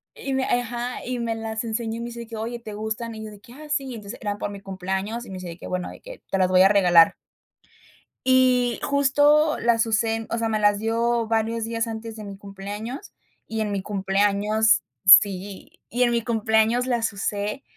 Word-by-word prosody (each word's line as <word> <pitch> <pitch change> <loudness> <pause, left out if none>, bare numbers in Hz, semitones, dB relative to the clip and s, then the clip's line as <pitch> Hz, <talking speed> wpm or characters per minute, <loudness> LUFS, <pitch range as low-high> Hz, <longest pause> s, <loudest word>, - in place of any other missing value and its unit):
Y 275 - -4
me, 265 - +1
ajá, 245 0 -2
y 250 0 -3
me 235 -1 -2
las 225 0 -4
enseñó 225 0 -3
y - - -6
me 235 - -4
dice 235 -1 -8
que: 225 - -8
"Oye, 235 +2 -4
¿te 215 -3 -8
gustan?" 220 +2 -4
Y 220 - -7
yo 215 - -8
de 205 - -13
que: 235 - -16
"Ah, 305 +3 -11
sí", 275 -4 -2
entonces, 210 +1 -9
era 205 -2 -3
por 205 - -4
mi 200 -1 -9
cumpleaños, 195 +4 -4
y - - -12
me - - -6
dice 185 -1 -7
de 170 -1 -8
que: - - -11
"Bueno, 180 -1 -3
de - - -12
que - - -11
te 195 - 0
las 185 -1 +2
voy 185 0 +5
a 190 - +8
regalar". 180 -5 +5 1.1
Y 255 -2 +3
justo 290 +2 +3
las 230 -1 +2
usé, 225 0 0
o 230 - -2
sea, 230 -1 0
me 220 -1 0
las 205 -1 +3
dio 230 +1 0
varios 225 0 0
días 230 0 -2
antes 225 0 -6
de 215 - -8
mi 200 -1 -8
cumpleaños, 205 - -7 0.4
y 225 - -4
en 215 -1 -1
mi 200 -1 -2
cumpleaños, 205 +2 +2 0.2
sí, 195 -1 +4
y 245 +2 +1
en 240 - +3
mi 235 0 +1
cumpleaños 220 +1 +2
las 240 -3 0
usé. 205 +4 -3
225 Hz, 215 wpm, -24 LUFS, 205-235 Hz, 1.1 s, a